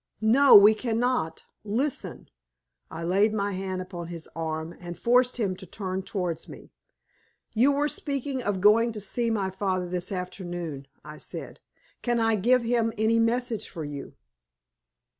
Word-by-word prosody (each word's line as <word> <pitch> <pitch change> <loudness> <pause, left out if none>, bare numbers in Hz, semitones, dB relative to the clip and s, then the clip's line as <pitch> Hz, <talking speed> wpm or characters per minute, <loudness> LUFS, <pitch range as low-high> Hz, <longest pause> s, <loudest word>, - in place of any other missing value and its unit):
"No, 265 +6 +7
we 205 +2 +9
cannot! 230 -7 -1 0.2
Listen!" 240 +8 -2 0.6
I 165 +1 -6
laid 200 +5 +2
my 200 -1 -1
hand 185 -1 -3
upon 175 -2 -7
his 170 -2 -7
arm, 160 0 -4
and 175 -1 -8
forced 250 +1 +3
him 200 -6 -1
to 190 -1 -11
turn 190 0 -4
towards 180 -4 -4
me. - - -12 0.8
"You 250 +6 +4
were 290 +1 +1
speaking 280 -3 -2
of 205 -5 -2
going 225 +3 +5
to 215 - -5
see 230 +4 -1
my 200 -4 -1
father 185 -1 -1
this 180 +1 -2
afternoon," 175 -6 -5 0.2
I 150 0 -10
said. - - -7 0.4
"Can 240 -1 0
I 225 -1 +3
give 245 +5 +3
him 230 -1 +1
any 220 +2 +3
message 235 -1 0
for 165 -4 -6
you?" 145 -1 -7
205 Hz, 155 wpm, -26 LUFS, 180-235 Hz, 0.8 s, we